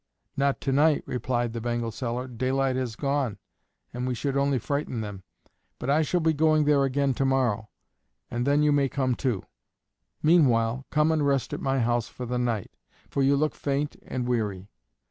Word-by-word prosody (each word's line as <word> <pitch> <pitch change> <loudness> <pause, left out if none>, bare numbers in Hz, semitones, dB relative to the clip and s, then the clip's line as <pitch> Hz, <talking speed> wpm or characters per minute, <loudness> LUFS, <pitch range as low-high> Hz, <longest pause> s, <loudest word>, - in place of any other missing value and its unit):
"Not 140 0 +1
to 135 - -1
night," 150 +2 +3
replied 120 -1 -1
the 115 - -4
bangle 120 -1 -2
seller; 120 +2 -3
"daylight 130 +2 0
has 125 -4 -2
gone, 140 -5 -1 0.6
and 125 +1 -3
we 125 - -1
should 140 +3 -2
only 140 -1 +2
frighten 130 -1 -2
them; 105 -3 -6 0.6
but 135 - -2
I 150 +3 +4
shall 175 +3 +1
be 160 0 +3
going 155 0 +3
there 145 -1 +4
again 135 0 +1
to 135 - -1
morrow, 125 -6 +1 0.6
and 120 +2 -1
then 145 +1 +3
you 150 - +4
may 140 -2 +2
come 130 -2 0
too. 120 -5 -1 0.8
Meanwhile, 130 -6 +3
come 150 +1 +3
and 155 -2 +1
rest 140 -2 +1
at - - -4
my 135 -1 +1
house 120 0 +1
for 125 - -7
the 125 +1 -2
night, 115 -5 -1 0.4
for 140 - 0
you 135 +1 +4
look 155 +2 +1
faint 145 +1 -2
and 125 -1 -3
weary." 105 -5 -2
130 Hz, 185 wpm, -26 LUFS, 120-140 Hz, 0.8 s, I